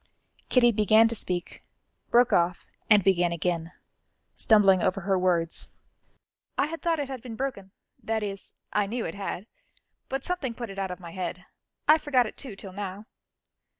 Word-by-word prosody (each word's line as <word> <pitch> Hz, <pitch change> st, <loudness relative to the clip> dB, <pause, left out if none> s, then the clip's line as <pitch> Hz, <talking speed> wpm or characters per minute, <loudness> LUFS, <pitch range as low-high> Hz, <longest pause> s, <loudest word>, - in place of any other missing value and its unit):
Kitty 240 Hz, -2 st, +5 dB
began 215 Hz, +1 st, +5 dB
to -, -, 0 dB
speak, 180 Hz, -4 st, -3 dB, 0.5 s
broke 240 Hz, 0 st, +4 dB
off, 175 Hz, +1 st, +2 dB, 0.2 s
and 210 Hz, -3 st, +6 dB
began 175 Hz, -2 st, +3 dB
again, 170 Hz, 0 st, -2 dB, 0.6 s
stumbling 195 Hz, -5 st, +4 dB
over 195 Hz, +3 st, 0 dB
her 195 Hz, +1 st, +1 dB
words: 175 Hz, -3 st, 0 dB, 0.8 s
"I -, -, +3 dB
had 325 Hz, +2 st, -6 dB
thought 335 Hz, -1 st, +1 dB
it 285 Hz, -, -2 dB
had 265 Hz, -3 st, -6 dB
been 235 Hz, -2 st, -8 dB
broken 220 Hz, -7 st, -4 dB, 0.3 s
that 220 Hz, -1 st, -1 dB
is, 195 Hz, -2 st, -6 dB, 0.2 s
I 205 Hz, -1 st, +2 dB
knew 230 Hz, +3 st, -3 dB
it 165 Hz, -, -4 dB
had 195 Hz, -1 st, -5 dB, 0.6 s
but 270 Hz, 0 st, -3 dB
something 290 Hz, -10 st, -2 dB
put 235 Hz, -4 st, -6 dB
it 195 Hz, -, -7 dB
out 190 Hz, -1 st, -2 dB
of 180 Hz, -, -6 dB
my 170 Hz, -2 st, -9 dB
head 180 Hz, 0 st, -5 dB, 0.4 s
I 310 Hz, +1 st, +7 dB
forgot 265 Hz, -5 st, +2 dB
it 215 Hz, -, -7 dB
too 250 Hz, -7 st, -8 dB
till 195 Hz, -1 st, -10 dB
now." 200 Hz, +1 st, -6 dB
200 Hz, 175 wpm, -27 LUFS, 185-240 Hz, 0.8 s, I